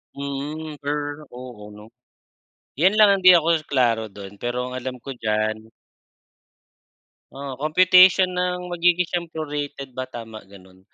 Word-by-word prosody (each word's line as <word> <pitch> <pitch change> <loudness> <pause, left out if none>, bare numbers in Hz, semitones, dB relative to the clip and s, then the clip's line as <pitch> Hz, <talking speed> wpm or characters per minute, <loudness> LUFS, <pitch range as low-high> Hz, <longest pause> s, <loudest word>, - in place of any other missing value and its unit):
Mm, 145 +2 -6
per 145 +1 -4
oo 120 -5 -10
'no. 105 +1 -14 0.9
Yan 185 +7 +4
lang 210 - +8
ang 190 - -7
di 185 - +10
ako 165 -2 +3
klaro 115 -6 0
dun, 100 0 -11
pero 125 +3 -3
ang 125 - -7
alam 130 0 -6
ko 135 +2 -8
diyan. 110 0 -2 1.6
Ah, 135 -1 -7
computation 185 +5 +5
ng 180 0 -2
magigi 175 +1 +2
siyang 170 -2 -3
prorated 145 -3 -5
ba, 130 - -3
tama 115 -3 -9
ganun. 95 -1 -18
140 Hz, 135 wpm, -22 LUFS, 115-165 Hz, 1.6 s, di